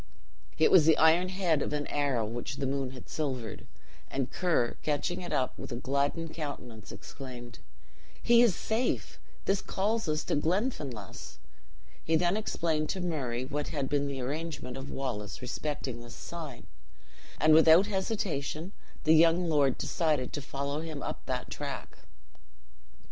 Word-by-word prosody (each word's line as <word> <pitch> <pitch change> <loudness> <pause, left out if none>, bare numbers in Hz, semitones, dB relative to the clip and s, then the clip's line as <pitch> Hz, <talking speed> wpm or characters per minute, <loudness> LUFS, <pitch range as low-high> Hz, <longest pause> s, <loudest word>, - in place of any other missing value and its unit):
It 155 - +5
was 160 -4 +7
the 160 - +6
iron 165 +3 +5
head 180 -6 +1
of - - -2
an 145 0 -1
arrow 140 -6 0
which 120 +5 -4
the 140 - -2
moon 135 -1 -1
had 130 -1 -11
silvered; 130 -8 -3 0.4
and 135 -1 -2
Ker, 165 -10 +1
catching 150 +4 -1
it 175 - -6
up, 130 - 0
with - - -7
a - - -2
gladdened 140 +6 -1
countenance 125 -9 -6
exclaimed, 120 - -9 0.6
"He 235 0 +7
is 230 -8 +5
safe! 225 +3 -1 0.3
this 195 0 +2
calls 210 -1 0
us 155 +1 0
to - - 0
Glenfinlass." 150 - -2 0.7
He 160 - +2
then 175 +3 +3
explained 160 -7 0
to 190 - -1
Murray 135 -9 -2
what 145 +2 -3
had 140 -3 -2
been 145 -1 +1
the 135 -2 -3
arrangement 145 0 -4
of 135 +1 -6
Wallace 120 -7 -4
respecting 130 -1 -4
this 120 0 -10
sign, 155 -8 -7 0.7
and 155 0 +6
without 160 +4 +8
hesitation 190 -5 -2 0.3
the 155 - +6
young 165 +2 +5
lord 145 -4 +3
decided 150 -6 0
to 145 - -3
follow 140 +1 -3
him 155 -3 -5
up - - -5
that - - -3
track. - - -6
150 Hz, 155 wpm, -30 LUFS, 135-170 Hz, 0.7 s, without